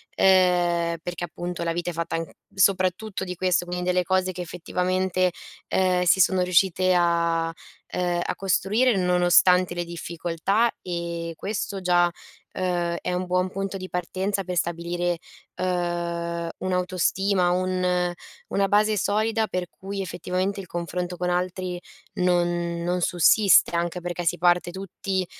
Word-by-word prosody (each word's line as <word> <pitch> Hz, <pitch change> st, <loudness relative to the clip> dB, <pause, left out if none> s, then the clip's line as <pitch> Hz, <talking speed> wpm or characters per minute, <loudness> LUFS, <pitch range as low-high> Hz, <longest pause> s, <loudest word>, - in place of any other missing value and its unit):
ehm, 175 Hz, -3 st, +3 dB
perché 175 Hz, 0 st, -5 dB
appunto 175 Hz, +1 st, -5 dB
la 170 Hz, -, 0 dB
vita 175 Hz, +1 st, -2 dB
è -, -, -10 dB
fatta 170 Hz, 0 st, -3 dB
an 165 Hz, -, -3 dB, 0.3 s
soprattutto 190 Hz, +1 st, +1 dB
di 180 Hz, -1 st, -5 dB
questo, 180 Hz, 0 st, +1 dB
in 180 Hz, 0 st, -2 dB
delle 180 Hz, 0 st, +2 dB
cose 185 Hz, +1 st, +1 dB
che 180 Hz, -, -6 dB
effettivamente, 180 Hz, +1 st, 0 dB, 0.4 s
ehm, 185 Hz, -1 st, +2 dB
si 180 Hz, +2 st, +4 dB
sono 185 Hz, +1 st, +3 dB
riuscite 185 Hz, 0 st, +3 dB
a 170 Hz, -1 st, +1 dB, 0.4 s
ehm, 175 Hz, -1 st, -1 dB
a -, -, -2 dB
costruire 205 Hz, +5 st, +2 dB
nonostante 180 Hz, 0 st, +4 dB
le 175 Hz, 0 st, -2 dB
difficoltà. 170 Hz, +6 st, -1 dB
E 170 Hz, -1 st, -4 dB
questo 200 Hz, -1 st, -3 dB
già, 175 Hz, -1 st, +3 dB, 0.4 s
ehm, 175 Hz, -2 st, -1 dB
è -, -, -2 dB
un 180 Hz, +1 st, -1 dB
buon 180 Hz, +1 st, +1 dB
punto 195 Hz, 0 st, -4 dB
di 185 Hz, 0 st, -7 dB
partenza 190 Hz, +3 st, -2 dB
per 180 Hz, -1 st, -4 dB
stabilire, 175 Hz, +1 st, -1 dB, 0.4 s
ehm, 170 Hz, -2 st, -2 dB
un'autostima, 185 Hz, 0 st, +1 dB
un 180 Hz, +1 st, +1 dB, 0.8 s
una 195 Hz, 0 st, +1 dB
base 210 Hz, +1 st, +3 dB
solida 220 Hz, +3 st, +1 dB
per 180 Hz, 0 st, -2 dB
cui 195 Hz, +1 st, -6 dB
effettivamente 185 Hz, +2 st, -2 dB
il 185 Hz, -, -12 dB
confronto 175 Hz, +1 st, -4 dB
con 180 Hz, 0 st, -1 dB
altri 180 Hz, 0 st, -2 dB, 0.4 s
non 175 Hz, -1 st, 0 dB
non 180 Hz, +1 st, -1 dB
sussiste. 180 Hz, +2 st, +5 dB
Anche 170 Hz, +1 st, -1 dB
perché 175 Hz, 0 st, -4 dB
si -, -, +1 dB
parte 175 Hz, +1 st, +2 dB
tutti 190 Hz, 0 st, -3 dB
180 Hz, 140 wpm, -25 LUFS, 175-185 Hz, 0.8 s, sussiste